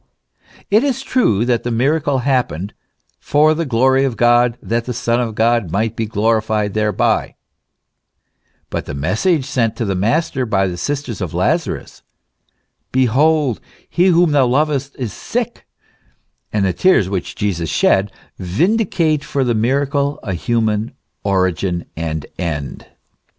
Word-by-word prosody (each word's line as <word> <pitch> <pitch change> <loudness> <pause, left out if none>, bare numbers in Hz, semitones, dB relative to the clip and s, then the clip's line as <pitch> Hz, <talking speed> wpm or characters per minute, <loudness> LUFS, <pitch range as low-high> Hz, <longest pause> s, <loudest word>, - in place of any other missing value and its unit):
It 215 +5 +5
is 270 -2 -1
true 120 - +2
that 120 -1 +1
the 120 - -3
miracle 140 +4 +1
happened 110 - 0 0.3
" - - -45
for 155 +2 +5
the 165 0 -2
glory 130 +2 +3
of 130 -4 -1
God, 120 0 +3
that 115 0 -2
the 125 - -4
Son 120 0 0
of 115 -3 -3
God 115 -4 +2
might 105 +5 -1
he 110 - 0
glorified 110 -1 0
thereby; 110 -1 0 0.6
" - - -47
but - - -3
the 70 - -5
message 110 - 0
sent 115 -4 0
to 115 - -2
the 100 - -1
Master 125 - 0
by 95 -3 +1
the 90 -2 -3
sisters 135 0 -4
of - - -4
Lazarus, - - -1 0.9
"Behold, 130 +1 +2 0.3
he 180 +2 +2
whom 175 -2 +4
thou 140 -3 +4
lovest, 140 +1 0
is 120 -7 -4
sick," - - -4 0.8
and 105 -2 +1
the 95 - +1
tears 145 - +3
which 95 -2 -4
Jesus 90 -6 -2
shed, 95 +6 +2 0.3
vindicate 160 - +1
for 140 - -1
the 120 -2 +1
miracle 140 +5 0
a 100 -6 -3
human 110 +3 -1 0.3
origin 95 -2 0
and 80 -2 -3
end. 75 -6 -4
120 Hz, 145 wpm, -18 LUFS, 100-140 Hz, 0.9 s, It